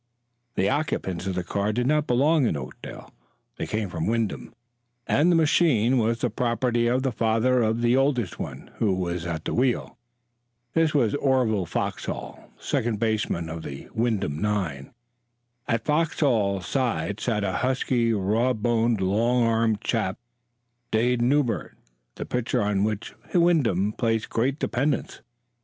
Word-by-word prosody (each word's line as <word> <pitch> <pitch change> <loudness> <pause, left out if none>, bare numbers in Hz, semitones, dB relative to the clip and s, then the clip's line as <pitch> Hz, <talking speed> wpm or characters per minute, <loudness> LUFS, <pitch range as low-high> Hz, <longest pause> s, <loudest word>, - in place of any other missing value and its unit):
The 95 - +2
occupants 130 - -1
of 95 - -2
the 90 - -1
car 100 +4 -1
did 120 +3 -1
not 150 +2 +2
belong 140 +3 +3
in 75 - -1
Oakdale; 65 -2 -9 0.4
they - - -3
came 110 -1 -2
from 80 -3 -3
Wyndham, 115 -2 -1 0.5
and 165 +5 +3
the - - +4
machine 145 -7 +3
was 115 +1 +1
the 125 - 0
property 120 +1 0
of 125 +2 +1
the 135 - +1
father 115 +2 +2
of 115 +1 0
the 120 +1 +4
oldest 130 -8 +1
one, - - -7
who 100 -4 +1
was 90 -2 -3
at 80 -2 -4
the - - -2
wheel. 125 -1 0 0.7
This 165 -2 +2
was 120 -7 +3
Orville 125 -9 +1
Foxhall, - - -4
second 110 -2 -1
baseman 110 -7 -1
of 80 0 -6
the 70 -3 -8
Wyndham 110 -10 -1
nine. 95 -10 -2 0.8
At 115 -1 -1
Foxhall's 130 - +1
side 115 - -1
sat 110 -3 -1
a 95 -2 -1
husky, 125 -2 +1
raw 110 +5 +1
boned, 115 -1 +1
long 115 +6 +2
armed 115 -2 +1
chap, 110 -5 -1 0.7
Dade 120 +2 +1
Newbert, 120 - 0 0.4
the - - -5
pitcher 125 -4 -1
on 100 -1 +1
which 105 0 -2 0.2
Wyndham 130 - +3
placed 115 -1 -1
great 130 +5 0
dependence. 145 -1 -1
115 Hz, 145 wpm, -25 LUFS, 100-125 Hz, 0.8 s, the